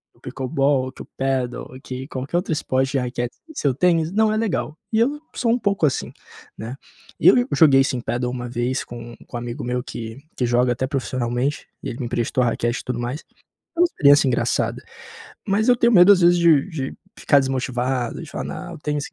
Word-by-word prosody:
o -, -, -26 dB
Pickleball, 135 Hz, 0 st, 0 dB
que -, -, -12 dB
o -, -, -16 dB
Padel, 130 Hz, -2 st, -1 dB, 0.2 s
que 130 Hz, +1 st, -6 dB
qualquer 135 Hz, +4 st, -3 dB
outro 180 Hz, -1 st, -2 dB
esporte 130 Hz, -2 st, 0 dB
de -, -, +2 dB
raquete 120 Hz, -1 st, -3 dB
sem 320 Hz, -, -14 dB
ser 145 Hz, -, -1 dB
o 130 Hz, -, +3 dB
tênis 165 Hz, +1 st, +2 dB
não 215 Hz, +1 st, +3 dB
é 215 Hz, -, 0 dB
legal, 150 Hz, -, -1 dB, 0.2 s
e 220 Hz, -, +1 dB
eu 280 Hz, +6 st, +1 dB, 0.2 s
sou 235 Hz, -2 st, +1 dB
um 240 Hz, -, +2 dB
pouco 200 Hz, -7 st, +1 dB
assim, 135 Hz, -, -1 dB, 0.5 s
né? 115 Hz, +4 st, -6 dB, 0.4 s
E -, -, +3 dB
eu -, -, +8 dB
e 245 Hz, -, +3 dB
joguei, 140 Hz, -5 st, +6 dB
sim, 130 Hz, -2 st, -2 dB
padel 125 Hz, +1 st, -2 dB
uma 120 Hz, -1 st, -5 dB
vez 125 Hz, +2 st, -1 dB
com 120 Hz, 0 st, -9 dB
com 120 Hz, -, -6 dB
um -, -, -3 dB
amigo 120 Hz, +4 st, -6 dB
meu 125 Hz, 0 st, -2 dB
que 115 Hz, -1 st, -7 dB, 0.2 s
que 125 Hz, -, -2 dB
joga 120 Hz, +1 st, +2 dB
até 130 Hz, +2 st, -1 dB
profissionalmente, 130 Hz, +1 st, -2 dB, 0.2 s
e -, -, -3 dB
ele 120 Hz, -, -7 dB
me 125 Hz, -, -3 dB
emprestou 120 Hz, +2 st, -1 dB
a -, -, +2 dB
raquete 120 Hz, +1 st, -1 dB
e -, -, -19 dB
tudo 125 Hz, -1 st, -3 dB
mais. 125 Hz, +5 st, -4 dB, 0.5 s
Foi 345 Hz, -, 0 dB
uma -, -, +7 dB
experiência 145 Hz, -, +4 dB
engraçada. 125 Hz, -, 0 dB, 0.6 s
Mas 215 Hz, +5 st, +2 dB
eu 245 Hz, -, +6 dB
tenho 235 Hz, 0 st, +3 dB
medo, 180 Hz, +1 st, +8 dB
às 195 Hz, -, +6 dB
vezes, 175 Hz, 0 st, +5 dB
de 165 Hz, -2 st, +4 dB
de 140 Hz, -7 st, -4 dB, 0.2 s
ficar 145 Hz, -, +4 dB
desmotivado, 130 Hz, -1 st, -2 dB
de 160 Hz, -, -9 dB
falar: -, -, -5 dB
"Não, 175 Hz, -1 st, -6 dB
o -, -, -8 dB
tênis", 150 Hz, -1 st, -2 dB
135 Hz, 225 wpm, -22 LUFS, 125-170 Hz, 0.6 s, eu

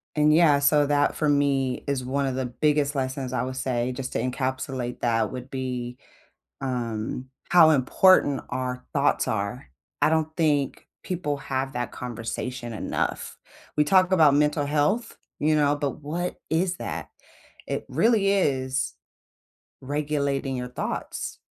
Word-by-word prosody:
and, 150 Hz, 0 st, +4 dB
yeah, 155 Hz, -3 st, +6 dB
so 145 Hz, 0 st, +3 dB
that 145 Hz, 0 st, +2 dB
for 155 Hz, -2 st, +1 dB
me 140 Hz, -3 st, +1 dB
is 135 Hz, -2 st, -1 dB
one 140 Hz, +2 st, -1 dB
of 135 Hz, -, -1 dB
the 130 Hz, 0 st, -2 dB
biggest 145 Hz, +2 st, +1 dB
lessons 130 Hz, -1 st, -2 dB
I 125 Hz, -1 st, 0 dB
would 130 Hz, 0 st, -4 dB
say 125 Hz, -1 st, -1 dB
just 130 Hz, 0 st, -5 dB
to -, -, 0 dB
encapsulate 130 Hz, 0 st, -3 dB
that 115 Hz, -2 st, +1 dB
would 130 Hz, +1 st, -7 dB
be, 125 Hz, -2 st, -4 dB, 0.6 s
um, 125 Hz, -1 st, -3 dB, 0.2 s
how 170 Hz, -3 st, +7 dB
important 145 Hz, +1 st, +4 dB
our 125 Hz, 0 st, -3 dB
thoughts 140 Hz, 0 st, +2 dB
are. 110 Hz, -, -3 dB, 0.3 s
I -, -, +4 dB
don't 160 Hz, -1 st, +2 dB
think 145 Hz, -5 st, 0 dB, 0.2 s
people 150 Hz, -6 st, -2 dB
have 135 Hz, 0 st, -3 dB
that 125 Hz, 0 st, -3 dB
conversation 120 Hz, 0 st, -5 dB
enough. 105 Hz, -, -3 dB, 0.4 s
We 150 Hz, -, +5 dB
talk 185 Hz, +4 st, +4 dB
about 155 Hz, -6 st, +6 dB
mental 150 Hz, 0 st, +2 dB
health 155 Hz, +11 st, 0 dB, 0.2 s
You 155 Hz, +1 st, +3 dB
know? 145 Hz, -1 st, +3 dB
But 145 Hz, 0 st, -3 dB
what 170 Hz, +5 st, -3 dB
is 175 Hz, +3 st, +1 dB
that? -, -, -5 dB, 0.6 s
It -, -, -3 dB
really 220 Hz, -4 st, +3 dB
is 130 Hz, -8 st, 0 dB, 0.9 s
regulating 140 Hz, -1 st, -1 dB
your 125 Hz, 0 st, -4 dB
thoughts. 125 Hz, -, -4 dB
140 Hz, 145 wpm, -25 LUFS, 125-150 Hz, 0.9 s, how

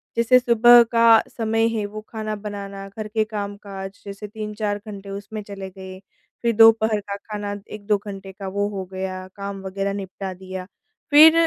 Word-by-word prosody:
जैसे 235 Hz, +2 st, +5 dB
सुबह 240 Hz, -1 st, +7 dB
का 230 Hz, -1 st, +7 dB, 0.2 s
समय 225 Hz, 0 st, +2 dB
है 210 Hz, -, -1 dB
वो 215 Hz, +1 st, -7 dB
खाना 215 Hz, -1 st, -4 dB
बनाना 200 Hz, -1 st, -7 dB
घर 215 Hz, +2 st, -6 dB
के 215 Hz, 0 st, +1 dB
काम-काज 200 Hz, -2 st, -6 dB
जैसे 200 Hz, +1 st, -7 dB
3-4 210 Hz, -1 st, -3 dB
घंटे 200 Hz, -1 st, -8 dB
उसमें 205 Hz, +2 st, -6 dB
चले 195 Hz, -1 st, -7 dB
गए 190 Hz, 0 st, -10 dB, 0.4 s
फिर 235 Hz, -1 st, +2 dB
दोपहर 225 Hz, -1 st, +6 dB
का -, -, -1 dB
खाना 205 Hz, 0 st, -5 dB, 0.2 s
1-2 210 Hz, 0 st, 0 dB
घंटे 195 Hz, -1 st, -7 dB
का 195 Hz, 0 st, -8 dB
वो 200 Hz, +2 st, -1 dB
हो 195 Hz, -2 st, -4 dB
गया 185 Hz, 0 st, -4 dB
काम, 200 Hz, -1 st, -5 dB
वग़ैरह 195 Hz, +1 st, -2 dB
निपटा 190 Hz, -1 st, -5 dB
दिया। 185 Hz, 0 st, -7 dB, 0.5 s
फिर 315 Hz, +2 st, +10 dB
205 Hz, 165 wpm, -23 LUFS, 195-220 Hz, 0.5 s, फिर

